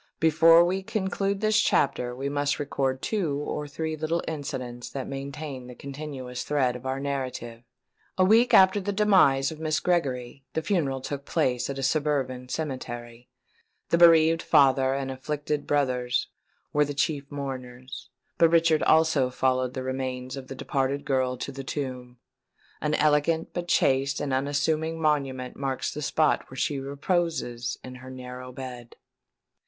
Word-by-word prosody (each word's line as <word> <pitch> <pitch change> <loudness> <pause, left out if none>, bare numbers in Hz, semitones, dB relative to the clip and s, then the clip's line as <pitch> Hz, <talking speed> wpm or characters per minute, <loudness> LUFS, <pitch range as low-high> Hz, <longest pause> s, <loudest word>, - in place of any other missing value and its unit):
Before 165 +1 +6
we 185 +2 -1
conclude 195 -1 -2
this 215 0 +3
chapter 125 -3 +1
we 135 +2 -3
must 145 -1 0
record 135 -2 -2
two 175 -10 -1
or 150 0 -4
three 160 +2 -3
little 155 +2 -1
incidents 125 -5 -5
that 135 -2 -5
maintain 140 -1 -6
the 125 - -10
continuous 135 -3 -6
thread 130 -4 +1
of 125 +1 -7
our 130 +1 -2
narrative. 130 -4 -4 0.6
A 185 - +5
week 225 +5 +5
after 190 +2 +6
the 205 - -2
demise 185 -10 +4
of 155 - -9
Miss 155 -1 0
Gregory, 135 -7 -1
the 160 - -1
funeral 145 -9 0
took 140 +1 -5
place 125 -6 0
at 140 - -4
a 135 - -3
suburban 135 -3 0
cemetery. 120 -5 -5 0.6
The 170 - +2
bereaved 165 -1 +6
father 135 -1 +4
and 135 -1 -3
afflicted 145 +2 -3
brothers 125 -4 0 0.4
were 150 - +4
the 145 0 -4
chief 140 -1 -1
mourners; 130 -3 -7 0.3
but 165 -2 +6
Richard 165 -2 +4
also 155 -5 +4
followed 130 0 0
the 130 - -3
remains 130 0 -4
of 135 -1 -8
the 135 - -7
departed 135 +1 -1
girl 130 -2 0
to 130 - -5
the 135 0 -7
tomb. 130 -3 -5 0.6
An 150 0 +1
elegant 155 +2 +2
but 175 -1 -4
chaste 135 -3 +2
and 140 -2 -2
unassuming 155 +4 0
monument 135 -5 0
marks 135 -1 -2
the 150 - -5
spot 155 +1 +1
where 130 - -10
she 140 +1 0
reposes 140 -4 -2
in 130 - -8
her 130 - -10
narrow 125 0 -8
bed. 125 -2 -8
140 Hz, 155 wpm, -26 LUFS, 130-155 Hz, 0.6 s, Before